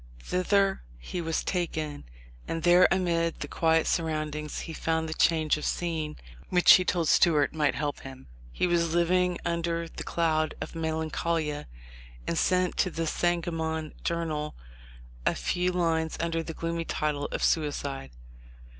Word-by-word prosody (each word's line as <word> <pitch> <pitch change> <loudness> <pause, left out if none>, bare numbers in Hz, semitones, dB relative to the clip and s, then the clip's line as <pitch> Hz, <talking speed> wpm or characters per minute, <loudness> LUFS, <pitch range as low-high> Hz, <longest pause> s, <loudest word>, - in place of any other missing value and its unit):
Thither 195 - +1 0.2
he 115 - -5
was 165 -1 -1
taken, 155 -5 -3 0.4
and 165 0 -3
there 175 +1 +7
amid 170 -3 0
the - - -3
quiet 160 -1 +2
surroundings 155 -2 -2
he 165 - -6
found 160 0 -1
the 160 - -3
"change 160 -2 +2
of 150 - -7
scene" 160 -3 -2 0.3
which 180 -1 +7
he 185 - +6
told 175 -2 0
Stuart 150 -4 +4
might 150 -3 +1
help 145 -1 -2
him. 135 -1 -10 0.3
He - - 0
was 170 -2 +1
living 180 +1 +2
under 170 0 -1
the - - -8
cloud 155 -2 0
of - - -6
melancholia, 160 -1 -2 0.6
and - - -1
sent 180 +2 +1
to 185 - +2
the 165 -1 -3
Sangamon 160 -2 -1
Journal 155 -3 -2 0.7
a - - +1
few 180 0 0
lines 165 -3 0
under 165 0 -1
the 165 -1 -7
gloomy 165 0 -3
title 150 -2 -1
of - - -3
"Sui 155 -3 +3
cide." 135 - -5
165 Hz, 150 wpm, -28 LUFS, 155-170 Hz, 0.7 s, there